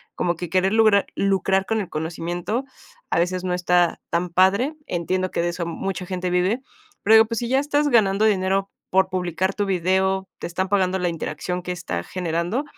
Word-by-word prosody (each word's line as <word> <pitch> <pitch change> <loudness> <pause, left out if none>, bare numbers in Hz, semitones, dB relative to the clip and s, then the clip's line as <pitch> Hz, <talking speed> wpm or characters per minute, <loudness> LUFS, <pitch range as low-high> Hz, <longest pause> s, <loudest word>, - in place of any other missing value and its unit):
como 175 -1 0
que 175 0 -6
querer 190 +3 +2
lugrar 215 -3 +4
lucrar 195 0 +1
con 220 +1 0
el 195 - -4
conocimiento 175 - -3 0.5
a - - +2
veces 180 +1 0
no 180 - -1
está 180 -1 +2
tan 170 +1 -1
padre. 200 - +3
Entiendo 185 +2 -1
que - - -1
de 175 - 0
eso 170 0 -3
mucha 185 +1 -4
gente 185 -1 -2
vive, 185 +8 +1 0.4
pero 215 - +4
digo, 220 0 +8
pues, 230 0 -3
si 240 - -3
ya 265 - +3
estás 290 +1 +1
ganando 215 -4 +3
dinero 195 -1 +1 0.2
por 190 0 +3
publicar 185 +1 -1
tu 205 - 0
video, 190 +1 +1
te - - -4
están 185 +2 -2
pagando 190 -2 +2
la 180 - 0
interacción 170 +2 -4
que 180 - -5
está 85 - -4
generando, 175 - -2
185 Hz, 195 wpm, -23 LUFS, 175-200 Hz, 0.5 s, digo